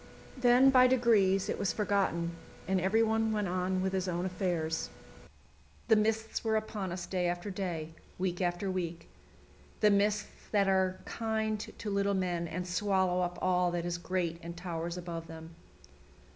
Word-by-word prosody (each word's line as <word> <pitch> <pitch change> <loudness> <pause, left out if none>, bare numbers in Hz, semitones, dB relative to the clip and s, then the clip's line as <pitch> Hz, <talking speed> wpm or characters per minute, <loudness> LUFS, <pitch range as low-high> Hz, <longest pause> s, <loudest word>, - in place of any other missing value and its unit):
Then 255 +1 +5
by 255 -1 +7
degrees 220 -7 +3
it - - -2
was 195 - +1
forgotten, 195 -5 0 0.4
and 190 -1 +1
everyone 220 +3 +2
went 210 -2 0
on 185 +1 -1
with 190 0 -1
his 190 -1 -1
own 175 0 -1
affairs. 175 -4 -1 1.0
The 220 - +7
mists 220 +1 0
were 220 -1 +1
upon 215 -4 -2
us 175 0 -4
day 180 -1 -1
after 175 +3 -3
day, 175 -5 -4 0.3
week 180 -1 -2
after 180 +2 -1
week 170 -2 -4 0.7
the 210 -1 +5
mists 210 +1 0
that 200 -2 +2
are 190 -1 +2
kind 220 -1 -1
to 210 - -6
little 200 0 +1
men 175 -2 -1
and 180 +3 -4
swallow 185 -1 +1
up 175 0 -2
all 180 -1 +3
that 175 -1 -2
is 175 0 -2
great 175 -2 -2
and 170 0 -8
towers 170 -1 -4
above 170 -2 -6
them. 160 0 -10
185 Hz, 160 wpm, -31 LUFS, 175-210 Hz, 1.0 s, by